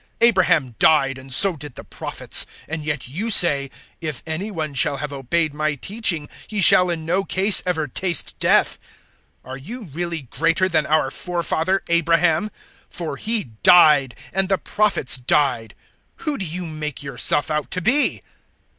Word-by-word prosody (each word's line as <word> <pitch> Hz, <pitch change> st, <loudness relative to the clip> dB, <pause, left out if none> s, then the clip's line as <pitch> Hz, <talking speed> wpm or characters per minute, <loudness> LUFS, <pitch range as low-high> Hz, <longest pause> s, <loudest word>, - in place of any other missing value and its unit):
Abraham 185 Hz, -, +3 dB
died, 135 Hz, -4 st, +2 dB
and 130 Hz, 0 st, -11 dB
so 185 Hz, +7 st, +5 dB
did 145 Hz, -4 st, -11 dB
the -, -, -10 dB
Prophets, -, -, -1 dB, 0.2 s
and 160 Hz, -1 st, -5 dB
yet 150 Hz, -4 st, -4 dB
*you* 185 Hz, -, -5 dB
say, 145 Hz, -9 st, +3 dB, 0.3 s
`If 155 Hz, -5 st, -6 dB
any 165 Hz, +6 st, -5 dB
one 160 Hz, -7 st, -5 dB
shall 140 Hz, +1 st, +1 dB
have 145 Hz, +1 st, -6 dB
obeyed 145 Hz, +4 st, -2 dB
my 155 Hz, 0 st, -2 dB
teaching, 175 Hz, -, +1 dB, 0.2 s
he 210 Hz, -, -5 dB
shall 180 Hz, -1 st, +5 dB
in 165 Hz, -2 st, -4 dB
no 180 Hz, +4 st, -1 dB
case 195 Hz, +1 st, +2 dB
ever 160 Hz, -4 st, -2 dB
taste 170 Hz, +4 st, +1 dB
death.' -, -, +1 dB, 0.7 s
008:053 130 Hz, -, -11 dB
Are 130 Hz, -, -6 dB
you 225 Hz, -, -9 dB
really 170 Hz, +1 st, -5 dB
greater 165 Hz, +8 st, 0 dB
than 155 Hz, -4 st, -1 dB
our 155 Hz, -3 st, 0 dB
forefather 175 Hz, +2 st, -2 dB
Abraham? 170 Hz, +2 st, +1 dB, 0.4 s
For 165 Hz, -5 st, -6 dB
he 215 Hz, -, -1 dB
died. 150 Hz, -8 st, +5 dB, 0.2 s
And 195 Hz, 0 st, 0 dB
the 195 Hz, -, +1 dB
prophets 205 Hz, -14 st, +2 dB
died. 125 Hz, -4 st, -1 dB, 0.4 s
Who 300 Hz, -3 st, -4 dB
do 190 Hz, -, -4 dB
you 175 Hz, +2 st, -6 dB
make 150 Hz, -3 st, -7 dB
yourself 140 Hz, +3 st, +1 dB
out 150 Hz, -1 st, -3 dB
to -, -, -3 dB
be?" 255 Hz, -, +3 dB
160 Hz, 165 wpm, -20 LUFS, 145-185 Hz, 0.7 s, so